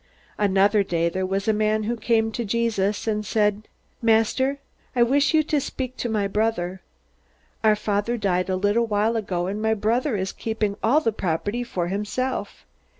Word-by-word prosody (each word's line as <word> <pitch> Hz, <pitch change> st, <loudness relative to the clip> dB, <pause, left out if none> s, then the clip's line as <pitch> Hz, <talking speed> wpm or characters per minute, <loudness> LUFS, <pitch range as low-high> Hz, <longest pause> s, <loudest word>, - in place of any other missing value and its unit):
Another 200 Hz, +1 st, +3 dB
day 170 Hz, -3 st, 0 dB
there 185 Hz, +2 st, -2 dB
was 195 Hz, +2 st, -2 dB
a 220 Hz, -, +4 dB
man 215 Hz, 0 st, +1 dB
who 235 Hz, +3 st, -1 dB
came 225 Hz, -1 st, +1 dB
to 235 Hz, -, -3 dB
Jesus 215 Hz, -2 st, 0 dB
and 210 Hz, -1 st, -1 dB
said: 210 Hz, 0 st, 0 dB, 0.3 s
"Master, 230 Hz, +4 st, +2 dB, 0.4 s
I 240 Hz, -, +5 dB
wish 280 Hz, +6 st, +3 dB
you 315 Hz, -, +6 dB
would 295 Hz, -2 st, +1 dB
speak 260 Hz, -2 st, -5 dB
to 240 Hz, -, -2 dB
my 210 Hz, -3 st, 0 dB
brother. 195 Hz, -3 st, -1 dB, 0.8 s
Our 215 Hz, -1 st, +5 dB
father 210 Hz, +3 st, -1 dB
died 185 Hz, -3 st, 0 dB
a 185 Hz, -, +1 dB
little 205 Hz, +5 st, +1 dB
while 215 Hz, +2 st, +1 dB
ago, 185 Hz, -5 st, -1 dB
and 200 Hz, +3 st, -3 dB
my 220 Hz, 0 st, +2 dB
brother 230 Hz, +4 st, 0 dB
is 190 Hz, 0 st, -2 dB
keeping 220 Hz, -2 st, -2 dB
all 280 Hz, +8 st, +3 dB
the 225 Hz, -, +1 dB
property 205 Hz, +4 st, -2 dB
for 180 Hz, -7 st, -3 dB
himself. 210 Hz, +7 st, -3 dB
215 Hz, 175 wpm, -24 LUFS, 200-230 Hz, 0.8 s, you